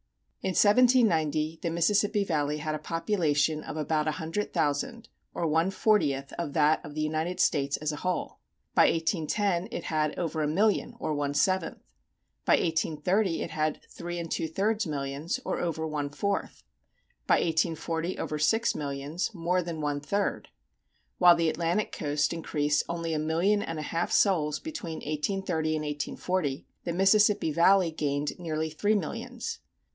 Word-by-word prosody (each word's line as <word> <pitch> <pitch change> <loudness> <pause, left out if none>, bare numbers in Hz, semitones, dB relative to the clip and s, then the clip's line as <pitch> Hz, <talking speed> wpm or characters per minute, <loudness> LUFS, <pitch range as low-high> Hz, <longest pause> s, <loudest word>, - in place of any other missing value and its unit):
In 190 - -2
1790 190 - +4
the 170 - -1
Mississippi 205 +5 +2
Valley 150 -5 0
had 155 +1 -3
a 155 - -3
population 155 -3 0
of - - -6
about 155 0 0
a 155 - +1
hundred 165 +6 -3
thousand, 170 - -1 0.3
or 170 - -1
one 165 +4 +2
fortieth 150 -10 +1
of 165 -5 -4
that 155 +1 +3
of 145 0 -9
the 155 - -2
United 160 +4 -1
States 140 -5 +2
as 155 0 -2
a 150 - -5
whole; 180 +3 -3 0.3
by - - +6
1810 175 +3 0
it 175 - -4
had 155 -1 -1
over 165 -2 -2
a 150 - +1
million, 210 +8 +1
or 155 - -2
one 145 -1 -2
seventh; 185 +2 0 0.6
by - - +3
1830 165 +3 +1
it - - -6
had 155 -1 -1
three 175 0 -6
and 170 -1 -5
two 160 - -1
thirds 205 +5 0
millions, 140 +1 -3
or - - -1
over 165 -2 -2
one 150 -2 -2
fourth; 200 +7 -3 0.6
by - - +5
1840 165 +1 -1
over 150 - -3
six 225 +10 +2
millions, 145 +7 -3
more 180 +1 +1
than 165 -2 -5
one 145 -1 -1
third. 200 +8 -1 0.7
While 175 -1 +8
the 165 -1 +2
Atlantic 170 +6 -1
coast 145 0 0
increased 150 -3 0
only 165 -1 -2
a 155 - 0
million 170 +7 +2
and 165 -6 -4
a 155 - -4
half 165 +3 -2
souls 155 -7 +2
between 200 - -6
1830 155 +1 -1
and 155 - -2
1840, 150 0 -2 0.2
the 170 - -1
Mississippi 195 -1 +4
Valley 175 +2 +4
gained 145 -1 -2
nearly 160 -2 -2
three 205 +8 +1
millions. 185 -7 -4
165 Hz, 160 wpm, -28 LUFS, 150-185 Hz, 0.7 s, While